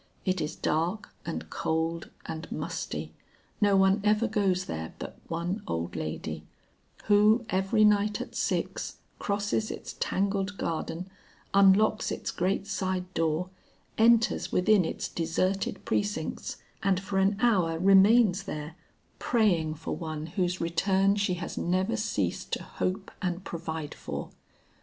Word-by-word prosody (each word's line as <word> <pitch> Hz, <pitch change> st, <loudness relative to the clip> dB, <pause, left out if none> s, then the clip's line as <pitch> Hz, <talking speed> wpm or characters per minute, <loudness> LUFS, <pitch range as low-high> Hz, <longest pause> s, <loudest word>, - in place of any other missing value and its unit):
It 185 Hz, -1 st, +1 dB
is 155 Hz, +1 st, -3 dB
dark, 175 Hz, +7 st, -1 dB
and 165 Hz, -, -4 dB
cold, 160 Hz, +1 st, -1 dB, 0.2 s
and 160 Hz, 0 st, -6 dB
musty. -, -, -4 dB, 0.5 s
No 200 Hz, -1 st, +5 dB
one 190 Hz, +2 st, +4 dB
ever 215 Hz, +2 st, +3 dB
goes 195 Hz, -4 st, +1 dB
there 80 Hz, -, -5 dB
but -, -, -7 dB
one 170 Hz, +5 st, -2 dB
old 85 Hz, +1 st, -3 dB
lady, 80 Hz, 0 st, -4 dB, 0.6 s
who 215 Hz, +3 st, +5 dB
every 195 Hz, +3 st, +3 dB
night 210 Hz, 0 st, +3 dB
at -, -, -6 dB
six, -, -, -2 dB, 0.2 s
crosses 205 Hz, +2 st, -1 dB
its -, -, -6 dB
tangled 195 Hz, 0 st, 0 dB
garden, 165 Hz, +2 st, -3 dB, 0.5 s
unlocks 200 Hz, +2 st, +5 dB
its -, -, -3 dB
great 190 Hz, +2 st, 0 dB
side 185 Hz, -2 st, -2 dB
door, 165 Hz, +3 st, 0 dB, 0.4 s
enters 230 Hz, +1 st, +4 dB
within 190 Hz, 0 st, +4 dB
its -, -, -3 dB
deserted 185 Hz, +4 st, -1 dB
precincts, 205 Hz, 0 st, -2 dB, 0.2 s
and 195 Hz, -3 st, +2 dB
for 195 Hz, 0 st, -1 dB
an 195 Hz, +1 st, +3 dB
hour 185 Hz, -9 st, +3 dB
remains 195 Hz, +2 st, +6 dB
there, 155 Hz, -3 st, -5 dB, 0.4 s
praying 175 Hz, -10 st, +2 dB
for 160 Hz, -, -4 dB
one 155 Hz, -2 st, -5 dB
whose 180 Hz, +2 st, -1 dB
return 190 Hz, +4 st, +2 dB
she 200 Hz, -3 st, +1 dB
has 175 Hz, 0 st, -5 dB
never 185 Hz, +6 st, +1 dB
ceased 220 Hz, -1 st, -2 dB
to -, -, -1 dB
hope 190 Hz, +2 st, -3 dB
and 180 Hz, -1 st, -2 dB
provide 160 Hz, -4 st, -5 dB
for. -, -, -6 dB
190 Hz, 135 wpm, -28 LUFS, 165-205 Hz, 0.6 s, remains